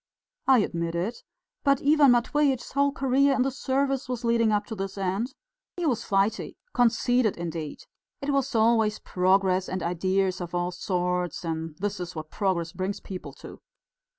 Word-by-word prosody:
"I 265 -1 +7
admit 170 -3 -2
it. 190 +8 -2 0.4
But 275 -1 +3
Ivan 295 -1 +6
Matveitch's 265 +2 +1
whole 280 +1 +2
career 275 +1 +2
in 255 - +2
the 270 - 0
service 270 0 -1
was 245 -2 -3
leading 230 -1 +3
up 205 0 +1
to 220 - -6
this 195 0 -5
end. 195 +7 -2 0.4
He 350 - -2
was 255 -8 +1
flighty 195 +2 0 0.2
conceited 245 -1 +2
indeed. 165 -3 -5 0.4
It 280 +1 -2
was 275 -2 0
always 220 -1 +3
'progress' 185 0 +1
and 185 -1 -3
ideas 185 +2 0
of 175 0 -5
all 175 0 0
sorts, 180 -1 -2
and 160 -1 -3
this 205 +1 -3
is 180 -1 -6
what 155 -1 -7
progress 175 -4 -1
brings 190 +3 -3
people 185 -2 -8
to!" - - -11
205 Hz, 165 wpm, -26 LUFS, 180-255 Hz, 0.4 s, I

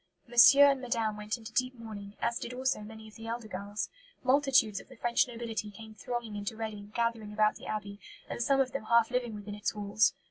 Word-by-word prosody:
"Monsieur 240 +4 +8
and 270 -1 -2
Madame 230 -4 -1
went 210 +2 -3
into 225 -1 -10
deep 255 +2 0
mourning, 210 -3 -9
as 235 0 0
did 250 - -6
also 260 -1 0
many 220 +1 -10
of 215 - -14
the 225 0 -9
elder 230 -1 -4
girls. 205 +1 -4 0.4
Multitudes 260 -5 +3
of - - -15
the 260 - -13
French 235 +1 +2
nobility 230 -3 -4
came 220 +1 -11
thronging 225 +1 -5
into 205 +2 -4
Reading, 210 -2 -6
gathering 230 -3 -1
about 215 0 +2
the - - -11
Abbey, 205 -1 -4 0.3
and - - -4
some 275 +3 +3
of 260 -1 +2
them 275 -5 -4
half 235 +1 +4
living 245 -3 -1
within 205 0 -7
its 210 +1 -2
walls." 210 +1 +2
225 Hz, 215 wpm, -31 LUFS, 210-240 Hz, 0.4 s, Monsieur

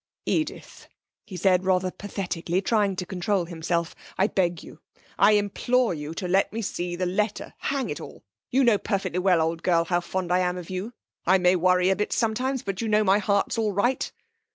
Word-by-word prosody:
'Edith,' 310 -1 -3 0.4
he 190 -4 -7
said 185 0 +3
rather 185 0 +1
pathetically, 180 -3 -3
trying 200 -1 +1
to 180 - -4
control 190 0 -1
himself. 170 0 -2 0.2
'I 190 - +3
beg 175 -3 0
you, 155 - -13 0.4
I 205 +2 +6
implore 220 +3 +1
you 150 0 -6
to 180 - -3
let 190 +2 +2
me 225 +1 -4
see 175 -2 -3
the 185 +1 -1
letter! 205 +4 -2
Hang 275 -1 -2
it - - -5
all! - - -11 0.3
You 270 +2 +3
know 230 -5 +4
perfectly 190 -4 -2
well, 180 -2 +3
old 165 +1 -1
girl, 170 -2 +2
how 175 +1 +1
fond 180 0 -3
I 180 - +4
am 180 0 0
of 180 0 -8
you. 190 +6 -4 0.3
I 190 +2 +6
may 180 0 +4
worry 180 +1 +3
you 190 - +4
a - - +2
bit 210 - -2
sometimes, 250 +3 0
but 195 0 -3
you 230 - -2
know 215 0 +3
my 200 0 +4
heart's 200 +2 0
all 215 -2 0
right.' 240 +7 0
190 Hz, 205 wpm, -25 LUFS, 180-210 Hz, 0.4 s, I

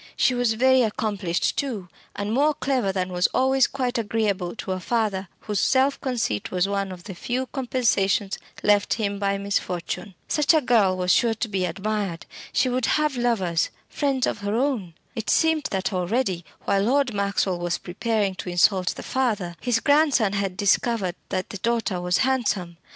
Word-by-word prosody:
She 260 - +3
was 245 -2 +1
very 260 +3 +4
accomplished, 210 -6 -1
too, 225 -10 -2 0.3
and 205 +1 -2
more 295 +4 +3
clever 255 -9 0
than 185 -1 -2
was 180 0 +3
always 265 0 +4
quite 250 -3 -2
agreeable 205 -4 -1
to 200 - -5
a 185 - -2
father 205 -2 -1
whose 210 -2 -2
self 270 +4 +2
conceit 235 - -1
was 180 +1 +1
one 200 -1 -2
of 180 -1 -9
the 195 - -7
few 245 +8 -2
compensations 230 -7 0 0.2
left 205 -1 +3
him 200 -3 -2
by 200 -1 0
misfortune. 195 -1 -3
Such 300 +2 +3
a 310 - +4
girl 215 -7 +3
was 180 0 +1
sure 230 -2 +3
to 225 - -2
be 190 -3 -1
admired. 195 -1 -3 0.3
She 260 - +2
would 250 -1 0
have 300 -2 +1
lovers 205 -9 +1 0.2
friends 275 -3 0
of - - -2
her 205 +1 -2
own. 230 - -1 0.2
It 225 -4 -4
seemed 320 -2 +3
that 190 +1 -2
already, 185 -1 -1 0.2
while 200 -1 +2
Lord 255 +3 +2
Maxwell 200 -2 0
was 175 0 -1
preparing 205 +2 -1
to 180 - -5
insult 180 0 +2
the - - -8
father, 215 -10 -1
his 245 -2 +1
grandson 285 -7 +3
had 195 -2 -2
discovered 200 -1 +1 0.2
that 185 - -3
the 200 - -6
daughter 230 -5 0
was 180 +1 +1
handsome. 210 -10 -1
210 Hz, 175 wpm, -24 LUFS, 190-250 Hz, 0.3 s, very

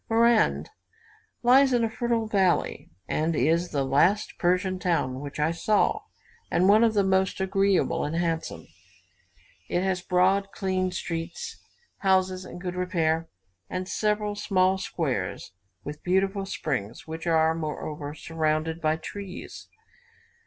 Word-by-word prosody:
Marand 225 - +3 0.7
lies 265 +3 +6
in 240 -1 +3
a 225 - +1
fertile 235 -1 0
valley, 195 -5 +1 0.2
and 160 +1 0
is 165 +6 +2
the 140 -2 0
last 165 +10 +2
Persian 185 +1 +1
town 165 -8 0
which 145 +1 -7
I 150 +2 +2
saw, 210 - +1 0.5
and 180 +2 +3
one 215 +3 +6
of 225 -2 +3
the 200 - +4
most 190 0 +1
agreeable 195 0 +1
and 150 +2 -2
handsome. 165 - -2 1.0
It 175 - 0
has 190 -2 0
broad, 190 +2 +2
clean 185 -2 -1
streets, 170 -1 -5 0.4
houses 185 -1 +1
in 175 - -9
good 180 0 -4
repair, 165 -3 0 0.4
and 185 0 -3
several 210 +1 0
small 190 -2 +1
squares 135 - -3 0.3
with 150 +1 -7
beautiful 195 +2 0
springs, 120 - -3
which 160 +1 -6
are, 160 -1 +3
moreover, 150 -2 -5
surrounded 160 0 -1
by 155 0 +1
trees. 190 +3 -8
180 Hz, 130 wpm, -26 LUFS, 160-195 Hz, 1.0 s, lies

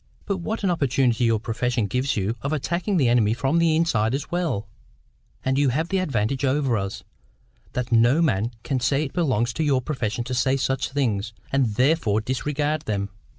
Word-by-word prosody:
But 200 -2 -1
what 215 +5 -4
an 190 - +2
opportunity 130 -6 +1
your 115 -2 +2
profession 120 +1 -1
gives 125 +5 -1
you 100 +3 -1
of 140 - -2
attacking 170 +6 -1
the 135 -6 +3
enemy 115 -2 +3
from 135 +7 +1
the 165 -2 +3
inside 125 -8 +1
as 140 - -5
well! 165 - -1 0.8
And 130 +1 +1
you 145 -2 +3
have 160 +7 -1
this 190 -1 +1
advantage 135 - -1
over 135 -2 +1
us, 100 -2 -3 0.7
that 125 0 -3
no 120 +6 +4
man 115 - +1
can 135 -3 -1
say 135 +3 +1
it 140 - -5
belongs 125 -9 +1
to 160 - -1
your 140 -4 +2
profession 120 -5 -2
to 125 +2 -5
say 130 +2 +2
such 135 0 -1
things, 115 -6 -1 0.2
and 130 -6 +1
THEREFORE 125 -5 +2
disregard 145 +5 -1
them." 100 -1 -2
130 Hz, 190 wpm, -24 LUFS, 115-150 Hz, 0.8 s, no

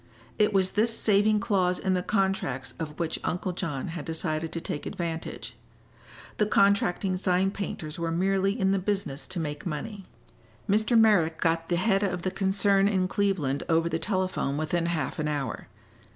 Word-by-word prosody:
It 210 -1 +4
was 190 -2 +2
this 225 +2 +2
saving 210 0 +3
clause 185 -3 +1
in 190 - 0
the 180 - +1
contracts 190 - -1
of 155 -2 -5
which 165 -1 -2
Uncle 180 +1 -2
John 165 -7 -3
had 165 -2 -5
decided 160 -1 -2
to 165 - -3
take 150 - -5
advantage. 165 -2 -5 0.8
The 210 - +2
contracting 200 -2 +2
sign 185 +1 +1
painters 170 -6 -5
were 165 0 -1
merely 195 +5 +1
in 190 -1 +2
the 195 - +2
business 185 -7 -3
to 180 - -4
make 150 -2 -4
money. 195 +5 -5 0.6
Mr. 215 +3 +3
Merrick 175 -8 +4
got 165 -1 0
the 175 - +2
head 195 +2 +2
of 180 -4 -1
the 185 - -1
concern 195 +1 +3
in 190 -3 +1
Cleveland 185 -9 0
over 165 0 +3
the 165 0 -1
telephone 185 -8 -1
within 165 +2 0
half 170 -1 -2
an 155 - 0
hour. 145 -3 -3
185 Hz, 170 wpm, -27 LUFS, 165-195 Hz, 0.8 s, It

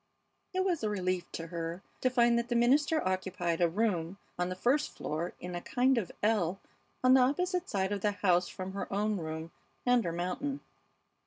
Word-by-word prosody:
It 375 0 0
was 350 -9 0
a 215 - +1
relief 185 -3 -1
to 165 - -4
her 170 +2 -4 0.2
to 255 - +3
find 240 -1 +4
that 235 0 -4
the 240 - 0
minister 285 +5 +3
occupied 185 -2 -1
a 170 - +5
room 185 -2 0 0.2
on 180 0 +1
the 185 - -3
first 265 +10 +1
floor 165 +4 -3
in 180 0 -6
a 175 - -3
kind 260 +6 +2
of 195 - -5
ell 195 -4 +2 0.4
on 255 0 +7
the 260 - +7
opposite 360 +8 +1
side 190 -1 0
of 205 -1 -2
the 210 0 +1
house 185 -2 +2
from 185 0 -6
her 195 - -5
own 210 +1 +1
room 160 -1 -5 0.3
and 245 -1 +4
her 170 - -1
mountain. 185 +12 -3
200 Hz, 195 wpm, -31 LUFS, 175-250 Hz, 0.4 s, on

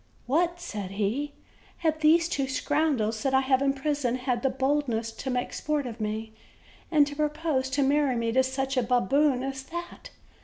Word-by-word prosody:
"What," 345 +6 +1
said 210 - -5
he, 230 +9 -1 0.5
"have 315 -1 +2
these 325 +2 +5
two 275 -5 -1
scoundrels 270 -6 0
that 265 +1 +1
I 265 - +5
have 265 0 +2
in 275 0 +3
prison 275 -3 -1
had 250 -2 -1
the 270 - +2
boldness 260 -4 0
to 245 +4 -6
make 250 -1 -2
sport 300 -2 -1
of 235 -2 -6
me, 220 +1 -3 0.6
and 300 -3 +5
to 290 0 -7
propose 300 -3 0
to 275 +2 +1
marry 280 -1 +2
me 230 -1 0
to 260 +3 +4
such 265 +1 -2
a - - +4
baboon 250 +3 +2
as 270 0 -4
that! 345 +5 -8
270 Hz, 185 wpm, -27 LUFS, 245-295 Hz, 0.6 s, these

